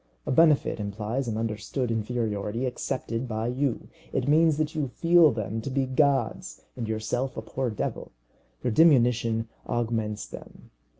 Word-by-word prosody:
A - - -2
benefit 155 -4 +4
implies 105 +5 -3
an 110 -2 -2
understood 115 +3 -2
inferiority 115 0 -2
accepted 125 -1 -3
by 110 -1 -2
you. 125 +1 -1 0.2
It 130 - -1
means 155 +1 +4
that 155 0 -1
you 150 -4 -1
feel 165 +4 +5
them 110 -1 -3
to 125 - -5
be 135 0 0
gods 135 -2 0
and 120 -3 -4
yourself 110 +4 -2
a - - -2
poor 125 +3 -2
devil. 105 - -4 0.5
Your 125 - +1
diminution 120 -5 +4 0.2
augments 110 -3 -1
them. - - -12
120 Hz, 145 wpm, -27 LUFS, 110-135 Hz, 0.5 s, feel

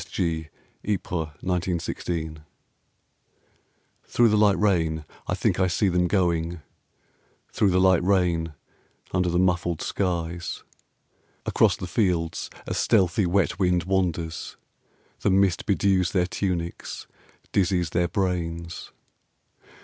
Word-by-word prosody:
S. - - -7
G., 80 -2 -2 0.3
YPRES, 90 -5 -2
1916) 85 -3 -2 1.6
Through 120 -1 +3
the 105 - +3
light 105 -2 +4
rain 80 -7 +1 0.2
I - - 0
think - - 0
I 95 - +3
see 95 +3 +1
them 90 0 +2
going, 85 -3 0 0.9
Through 100 - +2
the 95 0 +3
light 95 -2 +5
rain 85 -4 +1 0.6
under 90 -1 +1
the 85 - 0
muffled 90 -2 +1
skies; 85 -2 -2 0.8
Across 100 -5 +3
the 95 - -5
fields 85 -4 0 0.2
a - - -3
stealthy 95 +1 +2
wet 90 0 +1
wind 90 -2 +2
wanders, 85 -3 -2 0.6
The - - +1
mist 95 -1 +2
bedews 95 -2 +2
their 90 -2 +3
tunics, 90 -2 -3 0.5
dizzies 90 -4 +1
their 85 0 +1
brains. 85 -2 -3
90 Hz, 115 wpm, -25 LUFS, 85-95 Hz, 1.6 s, light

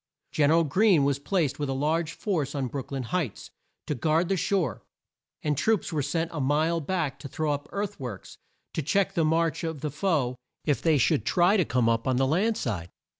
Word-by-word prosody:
Gen 145 -2 +3
er 160 - +5
al 165 - +4
Greene 180 +1 +4
was 140 0 +1
placed 150 -2 0
with 145 -2 -2
a - - 0
large 155 +4 0
force 160 -10 -2
on 135 -2 -1
Brook 130 +1 -5
lyn 135 -2 -2
Heights, 145 - -3 0.3
to - - -1
guard 160 +6 +1
the 195 - +2
shore, 185 -1 0 0.6
and 150 -1 +1
troops 205 +3 +1
were 150 - +1
sent 165 +4 -1
a 150 - -2
mile 155 +5 +2
back 160 -2 -2
to 140 - -7
throw 155 +3 -1
up 145 +1 -4
earth 200 0 -3
works 125 -7 -7 0.3
to - - -1
check 195 +6 +1
the 170 -4 +1
march 165 +2 +1
of 160 -4 -4
the 150 - -2
foe 145 -6 0 0.3
if 145 -3 +1
they 160 -3 +3
should 115 -4 +2
try 175 - +3
to 185 -6 +3
come 125 -3 +1
up 115 +1 +1
on 130 -1 +2
the 135 - +3
land 200 +11 +1
side. 90 - -3
155 Hz, 220 wpm, -27 LUFS, 135-170 Hz, 0.6 s, er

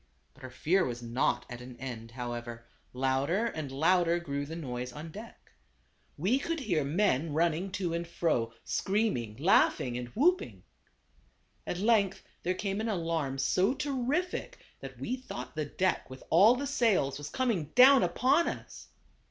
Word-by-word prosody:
But 135 - -19
our 130 - -6
fear 170 +9 +1
was 120 -1 -4
not 120 +3 0
at 120 -1 -8
an 125 0 -10
end, 120 -3 -7
however; 120 -1 -6 0.3
louder 135 - 0
and 155 - -4
louder 170 +4 +3
grew 145 -4 -4
the 160 - -6
noise 125 -6 -5
on 155 +5 -8
deck. 220 +6 -12 0.7
We 200 - +2
could 330 +3 -2
hear 175 - 0
men 155 -1 +1
running 170 +3 +1
to 180 -4 -2
and 170 0 -3
fro, 155 -9 0
screaming, 195 - -1
laugh 165 +9 +4
ing, 125 -2 -3
and 125 - -5
whooping. 355 +9 +1 1.0
At - - -2
length 200 -1 +2 0.2
there 180 +1 -1
came 200 +1 -2
an 225 - -2
alarm 165 -8 -1
so 185 - +2
terrific 290 +5 -2 0.2
that - - -9
we 255 - -2
thought 255 - -8
the 155 -1 -1
deck 185 +3 -1
with 130 0 -10
all 205 +9 +7
the 280 +3 -3
sails 200 - +1
was 145 0 -6
coming 230 -7 0
down 265 +2 +8
upon 255 - +2
us. - - -7
170 Hz, 160 wpm, -30 LUFS, 135-215 Hz, 1.0 s, down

